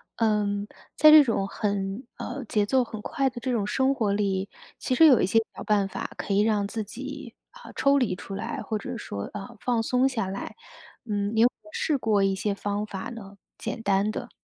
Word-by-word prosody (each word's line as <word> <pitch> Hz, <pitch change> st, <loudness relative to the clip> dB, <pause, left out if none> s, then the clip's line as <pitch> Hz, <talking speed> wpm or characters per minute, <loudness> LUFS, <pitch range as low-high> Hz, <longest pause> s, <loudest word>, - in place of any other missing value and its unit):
嗯， 210 Hz, -2 st, +1 dB, 0.3 s
在 305 Hz, 0 st, +8 dB
这 305 Hz, -1 st, +11 dB
种 215 Hz, -5 st, 0 dB
很 200 Hz, +3 st, -3 dB
呃， 280 Hz, -2 st, -5 dB
节 210 Hz, -2 st, +1 dB
奏 255 Hz, +3 st, +2 dB
很 220 Hz, -1 st, -7 dB
快 270 Hz, +5 st, 0 dB
的 240 Hz, -, -9 dB
这 255 Hz, -, -1 dB
种 215 Hz, -4 st, 0 dB
生 265 Hz, +4 st, +2 dB
活 215 Hz, -7 st, 0 dB
里， 195 Hz, -1 st, 0 dB, 0.3 s
其 255 Hz, -, -1 dB
实 325 Hz, -, +7 dB
有 265 Hz, -7 st, +7 dB
一 -, -, +3 dB
些 225 Hz, +5 st, +3 dB
小 -, -, -9 dB
办 205 Hz, -2 st, +2 dB
法 -, -, -5 dB
可 200 Hz, -, -3 dB
以 195 Hz, -, +3 dB
让 210 Hz, -1 st, +2 dB
自 220 Hz, 0 st, -3 dB
己， 270 Hz, +3 st, -8 dB, 0.2 s
啊， -, -, -13 dB
抽 280 Hz, 0 st, +4 dB
离 220 Hz, -9 st, +1 dB
出 195 Hz, +1 st, -9 dB
来， 195 Hz, -, -4 dB
或 220 Hz, -, -2 dB
者 245 Hz, +4 st, -6 dB
说， 100 Hz, -, -5 dB
呃， 215 Hz, +4 st, -8 dB
放 235 Hz, -1 st, 0 dB
松 250 Hz, +3 st, +2 dB
下 230 Hz, -7 st, -2 dB
来。 195 Hz, +1 st, -6 dB, 0.5 s
嗯， 205 Hz, -1 st, -2 dB
你 220 Hz, -, +4 dB
有 235 Hz, -, +8 dB
没 -, -, -5 dB
有 -, -, -13 dB
试 300 Hz, -, 0 dB
过 215 Hz, -5 st, +2 dB
一 195 Hz, 0 st, +2 dB
些 200 Hz, +1 st, -1 dB
方 205 Hz, +1 st, -2 dB
法 195 Hz, -3 st, -6 dB
呢？ 205 Hz, -4 st, -10 dB, 0.2 s
简 230 Hz, -, -5 dB
单 200 Hz, 0 st, +2 dB
的。 -, -, -5 dB
215 Hz, 235 characters per minute, -26 LUFS, 200-250 Hz, 0.5 s, 这